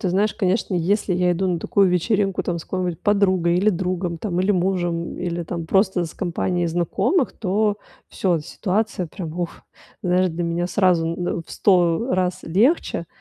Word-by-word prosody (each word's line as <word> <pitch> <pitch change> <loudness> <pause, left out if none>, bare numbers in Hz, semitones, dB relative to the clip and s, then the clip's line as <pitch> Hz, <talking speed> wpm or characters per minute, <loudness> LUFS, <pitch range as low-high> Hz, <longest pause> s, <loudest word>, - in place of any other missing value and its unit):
ты 190 - -1
знаешь, 200 +4 +1
конечно, 190 +1 0
если 185 +2 +1
я 180 0 +2
иду 180 +2 0
на 175 -3 -1
такую 195 +2 +3
вечеринку 195 +2 +1
там 170 -1 -2
с 160 - -9
какой-нибудь 180 -3 -3
подругой 185 -4 +2
или 205 +4 +3
другом 180 -2 -2
там, 180 -1 -2
или 190 +2 +2
мужем, 175 -3 -1
или 175 -1 -3
там 170 0 -5
просто 190 0 +2
с 160 - -8
компанией 175 0 -1
знакомых, 175 - +1
то 205 +1 0 0.3
всё, 175 -4 0
ситуация 190 +3 -2
прям- 170 +1 -7
вух! 175 +1 -3 0.5
Знаешь, 180 +1 +2
для 170 +2 -3
меня 170 +1 -1
сразу 180 -3 +2
н 170 +2 -2
э, - - 0
в - - -15
100, 180 +3 +2
э, - - +2
раз 185 -1 0
легче, 200 - +1
180 Hz, 180 wpm, -22 LUFS, 170-195 Hz, 0.5 s, такую